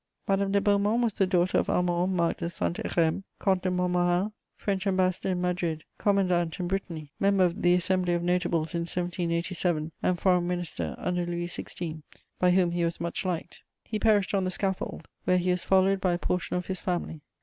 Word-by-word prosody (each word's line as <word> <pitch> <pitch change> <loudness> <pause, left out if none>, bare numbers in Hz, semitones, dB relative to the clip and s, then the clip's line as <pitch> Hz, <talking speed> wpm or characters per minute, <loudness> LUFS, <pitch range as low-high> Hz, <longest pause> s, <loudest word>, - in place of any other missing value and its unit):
Madame 195 0 +1
de 200 - +4
Beaumont 205 +3 +2
was 230 -3 +1
the 195 - +1
daughter 180 -1 +2
of - - -1
Armand 180 +1 +1
Marc 170 -1 +1
de 170 - -3
Saint 170 0 -2
Hérem, 165 +2 0 0.2
Comte 190 -2 +1
de 185 - 0
Montmorin, 180 +2 +1 0.3
French 200 -1 -1
Ambassador 185 -1 +1
in 180 -1 0
Madrid, 175 -3 -1 0.2
commandant 180 -4 +1
in 180 - -1
Brittany, 170 -6 -4
member 195 -1 +3
of 175 -1 -2
the 175 0 +5
Assembly 180 0 +1
of 170 - -2
Notables 175 -2 0
in 170 - 0
1787, 170 -2 -1
and 180 -1 +1
Foreign 180 -1 +3
Minister 175 -1 -3
under 180 -1 -1
Louis 175 0 -2
XVI., 170 -2 -6 0.4
by 180 - +4
whom 180 -1 +3
he 175 0 0
was 170 0 -1
much 170 0 -3
liked: 175 -2 -3 0.2
he 215 - -3
perished 210 -3 +3
on 195 -1 +2
the 185 - 0
scaffold, 190 +1 -2 0.2
where 180 - +4
he 180 0 +1
was 180 -1 -1
followed 190 0 +3
by 185 -2 +2
a - - 0
portion 180 0 -2
of 180 - -3
his 190 -1 -3
family. 175 -4 -3
180 Hz, 195 wpm, -28 LUFS, 175-190 Hz, 0.4 s, the